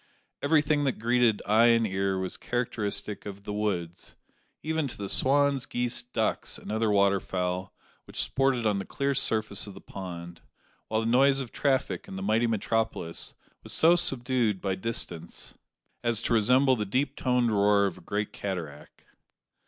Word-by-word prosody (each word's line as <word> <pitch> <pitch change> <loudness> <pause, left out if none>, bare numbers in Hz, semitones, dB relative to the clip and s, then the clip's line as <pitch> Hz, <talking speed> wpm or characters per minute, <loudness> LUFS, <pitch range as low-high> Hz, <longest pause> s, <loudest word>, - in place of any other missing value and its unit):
Everything 150 0 +2
that 135 -3 0
greeted 120 -1 +2
eye 110 +3 +5
and 115 -1 +4
ear 95 -1 -1
was 95 -1 -3
characteristic 110 -4 -3
of 100 0 -8
"the 105 - -5
woods," 90 -5 -3 0.5
even 160 -1 -1
to - - -8
the 100 - -4
swans, 140 +2 +2
geese, 120 0 -1
ducks, 120 - -2
and - - -8
other 110 0 +1
water 100 -1 +3
fowl 90 0 -3 0.3
which - - -6
sported 130 -3 +1
on 105 -2 +2
the - - -3
clear 140 0 -1
surface 110 -6 0
of 100 - -9
the - - -10
pond; 85 -3 -8 0.5
while 110 0 0
the - - -3
noise 135 +4 +4
of 130 -4 -5
traffic 130 -10 -1
in - - -8
the 95 - -5
mighty 110 +4 +2
metropolis 110 -6 -2 0.3
was - - -4
so 170 +2 +6
subdued 125 - +1
by 95 0 -1
distance 95 -5 -4 0.5
as 115 -1 +3
to - - +1
resemble 130 +4 +4
the 110 - -2
deep 130 +7 -1
toned 125 -2 +1
roar 100 0 +4
of 95 - -3
a - - -17
great 105 +1 -3
cataract. 90 -7 -6
110 Hz, 170 wpm, -28 LUFS, 100-130 Hz, 0.5 s, so